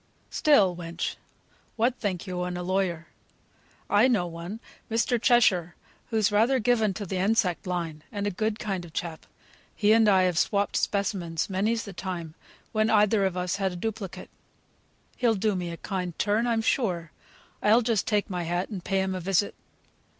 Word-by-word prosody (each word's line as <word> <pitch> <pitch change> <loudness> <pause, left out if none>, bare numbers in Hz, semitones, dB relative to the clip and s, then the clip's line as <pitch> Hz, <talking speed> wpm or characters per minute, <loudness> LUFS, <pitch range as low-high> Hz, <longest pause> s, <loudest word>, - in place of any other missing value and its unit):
Still, 205 -12 +4
wench! 170 0 -4 0.6
what 240 +2 +2
think 190 -4 -2
yo 180 -2 -4
of 180 0 -3
a 180 - -4
lawyer? 180 -3 -1 0.8
I 205 +5 +5
know 215 -9 +2
one, 170 +5 -7 0.3
Mr. 230 +1 +1
Cheshire, 190 -9 +3 0.3
who's 215 -3 +2
rather 225 +6 +3
given 220 -4 +2
to 205 - -4
th' 185 - -11
insect 190 -1 +1
line 170 -4 -3
and 205 -1 -3
a 205 - 0
good 215 +3 -1
kind 195 -5 -3
o' 175 - -10
chap. 160 0 -5 0.5
He 210 0 +4
and 225 -1 +5
I 190 -2 +5
have 180 -2 +2
swopped 200 0 +1
specimens 190 -4 -1
many's 215 +5 0
the 200 - -8
time, 170 -3 -5 0.4
when 215 0 +1
either 210 -1 +4
of 185 -1 -1
us 180 0 -1
had 190 -2 -1
a - - -7
duplicate. 200 0 -5 0.9
He'll 235 -3 +2
do 210 +1 +1
me 180 -1 -3
a 170 - -6
kind 180 -3 -4
turn, 215 +3 +1
I'm 225 -1 +1
sure. 175 - 0 0.5
I'll 225 +4 +5
just 225 -3 0
take 210 -3 +1
my 180 -2 -3
hat, 175 +2 -2
and 195 -5 -6
pay 195 +1 0
him 190 0 -1
a 185 - -3
visit." 195 +2 +1
195 Hz, 180 wpm, -27 LUFS, 180-220 Hz, 0.9 s, I